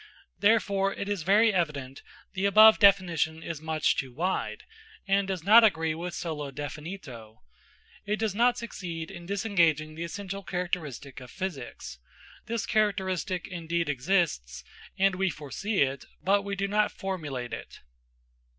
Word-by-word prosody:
Therefore, 200 Hz, -2 st, +3 dB
it 200 Hz, -, -4 dB
is 205 Hz, -3 st, -2 dB
very 210 Hz, +6 st, +4 dB
evident 145 Hz, -7 st, -2 dB, 0.3 s
the 190 Hz, +1 st, +1 dB
above 215 Hz, +2 st, +8 dB
definition 175 Hz, -5 st, +3 dB
is 160 Hz, -2 st, -5 dB
much 160 Hz, -1 st, +1 dB
too 130 Hz, -2 st, -3 dB
wide, 175 Hz, +9 st, -2 dB, 0.4 s
and 195 Hz, 0 st, +2 dB
does 185 Hz, -4 st, -3 dB
not 220 Hz, +5 st, +8 dB
agree 160 Hz, -7 st, +2 dB
with 170 Hz, +2 st, -5 dB
solo 150 Hz, -4 st, -4 dB
definito. 145 Hz, -, -8 dB, 0.7 s
It 210 Hz, -, +1 dB
does 220 Hz, -3 st, -1 dB
not 240 Hz, +3 st, +3 dB
succeed 175 Hz, -9 st, -6 dB
in 170 Hz, 0 st, -10 dB
disengaging 170 Hz, -7 st, +1 dB
the 165 Hz, +2 st, -5 dB
essential 195 Hz, +3 st, -5 dB
characteristic 170 Hz, -8 st, -4 dB
of 125 Hz, -1 st, -11 dB
physics. 125 Hz, -, -6 dB, 0.5 s
This 230 Hz, 0 st, -2 dB
characteristic 190 Hz, -4 st, 0 dB
indeed 170 Hz, -3 st, -2 dB
exists, 135 Hz, -, 0 dB, 0.3 s
and 195 Hz, 0 st, +3 dB
we 190 Hz, +1 st, 0 dB
foresee 165 Hz, +6 st, -1 dB
it, 135 Hz, 0 st, -3 dB, 0.2 s
but 200 Hz, +2 st, +2 dB
we 200 Hz, 0 st, -4 dB
do 195 Hz, 0 st, -1 dB
not 210 Hz, +1 st, +2 dB
formulate 150 Hz, -11 st, -5 dB
it. -, -, -8 dB
180 Hz, 140 wpm, -28 LUFS, 155-200 Hz, 0.7 s, above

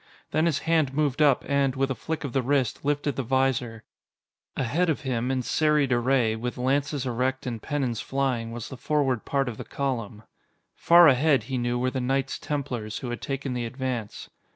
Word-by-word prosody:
Then 160 Hz, +2 st, +2 dB
his 155 Hz, -5 st, +1 dB
hand 160 Hz, -5 st, +2 dB
moved 150 Hz, -1 st, +1 dB
up 145 Hz, -4 st, +4 dB
and, 140 Hz, -1 st, +1 dB
with 135 Hz, 0 st, 0 dB
a -, -, +2 dB
flick 155 Hz, +7 st, -4 dB
of 135 Hz, -4 st, -5 dB
the 135 Hz, -, +2 dB
wrist, 130 Hz, -2 st, 0 dB
lifted 145 Hz, 0 st, 0 dB
the -, -, +1 dB
visor. 125 Hz, -3 st, 0 dB, 0.7 s
Ahead 155 Hz, +8 st, +1 dB
of 155 Hz, -, 0 dB
him, 125 Hz, -3 st, -1 dB
in 130 Hz, -1 st, 0 dB
serried 150 Hz, -1 st, +2 dB
array, 120 Hz, -2 st, +2 dB
with 120 Hz, +3 st, -4 dB
lances 140 Hz, +2 st, 0 dB
erect 130 Hz, +2 st, -1 dB
and 115 Hz, -3 st, -4 dB
pennons 135 Hz, -6 st, -2 dB
flying, 130 Hz, -4 st, -1 dB
was 115 Hz, -1 st, -6 dB
the 130 Hz, -, -8 dB
forward 135 Hz, -5 st, 0 dB
part 135 Hz, -1 st, 0 dB
of 115 Hz, -3 st, -4 dB
the -, -, -6 dB
column. 115 Hz, -6 st, -4 dB, 0.5 s
Far 170 Hz, 0 st, +7 dB
ahead, 140 Hz, -2 st, +4 dB
he 130 Hz, +3 st, -3 dB
knew, 120 Hz, 0 st, 0 dB
were 130 Hz, +1 st, 0 dB
the 130 Hz, -, -2 dB
Knights 135 Hz, +2 st, -1 dB
Templars, 125 Hz, -7 st, -3 dB
who 125 Hz, -, -5 dB
had 120 Hz, -, -5 dB
taken 135 Hz, -2 st, -3 dB
the 120 Hz, -1 st, -2 dB
advance. 125 Hz, -3 st, -5 dB
130 Hz, 195 wpm, -26 LUFS, 120-140 Hz, 0.7 s, Far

